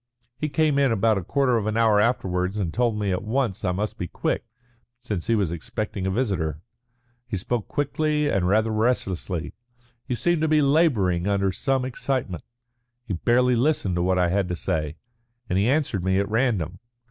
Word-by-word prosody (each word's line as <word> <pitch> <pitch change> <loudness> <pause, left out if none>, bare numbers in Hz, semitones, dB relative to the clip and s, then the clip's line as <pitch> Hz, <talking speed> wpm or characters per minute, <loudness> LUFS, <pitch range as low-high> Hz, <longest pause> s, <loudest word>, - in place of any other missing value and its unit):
He 150 +4 -3
came 145 0 +2
in 135 -3 +3
about 110 -1 +2
a - - -7
quarter 130 - +2
of 110 -1 -2
an 110 +1 0
hour 110 -2 +4
afterwards 95 -4 0
and 90 -6 -2
told 120 -3 +1
me 105 -2 -1
at 90 - -1
once 110 -3 -1
that 95 - 0
I - - +2
must 105 +4 -3
be 90 - -2
quick, - - -2 0.5
since 105 -8 -4
he 115 - +3
was 100 -6 0
expecting 95 +3 -4
a - - +1
visitor. 95 - -1 0.7
He 110 -5 -3
spoke 110 +4 -2
quickly 150 +1 0
and 95 -9 +1
rather 110 +3 +2
restlessly. 100 -7 -1 0.5
He 125 - -2
seemed 175 +5 +1
to 160 - +2
be 155 0 +4
labouring 130 - +2
under 100 -1 +1
some 130 +6 0
excitement. 130 -8 -3 0.6
He 100 - -3
barely 125 +7 +3
listened 120 - +1
to 85 - 0
what 90 +1 +2
I 90 -1 +3
had 95 0 0
to 90 - -1
say, 75 -2 -2 0.5
and 90 - +1
he 105 +4 +2
answered 135 - 0
me 95 +1 +2
at 100 0 +1
random. 105 - 0
105 Hz, 195 wpm, -24 LUFS, 95-125 Hz, 0.7 s, hour